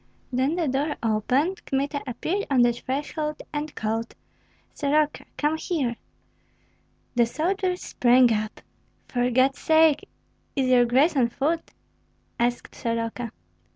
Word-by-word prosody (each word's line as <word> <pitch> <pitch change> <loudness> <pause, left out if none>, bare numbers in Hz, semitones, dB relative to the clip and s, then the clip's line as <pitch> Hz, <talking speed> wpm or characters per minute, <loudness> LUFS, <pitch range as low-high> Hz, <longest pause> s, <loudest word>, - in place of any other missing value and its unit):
Then 260 +6 +1
the 340 -3 0
door 280 +3 0
opened, 255 - +1
Kmita 280 +1 -1
appeared 330 - -2
on 260 -3 +4
the 240 0 +4
threshold, 295 +4 -3
and 300 0 -4
called, 225 +1 -2 0.6
"Soroka! 300 +1 +1
come 300 +1 +1
here!" 285 -8 -1 1.2
The 235 -2 +3
soldiers 365 - -1
sprang 245 -1 +4
up. 215 0 -3 0.5
"For 245 0 0
God's 260 +2 +2
sake, 315 -2 +4 0.5
is 265 -3 +1
your 245 -1 +6
grace 270 +7 +3
on 245 -4 +3
foot?" 310 +7 -1 0.7
asked 240 +1 -1
Soroka. 230 0 -3
270 Hz, 120 wpm, -25 LUFS, 240-305 Hz, 1.2 s, your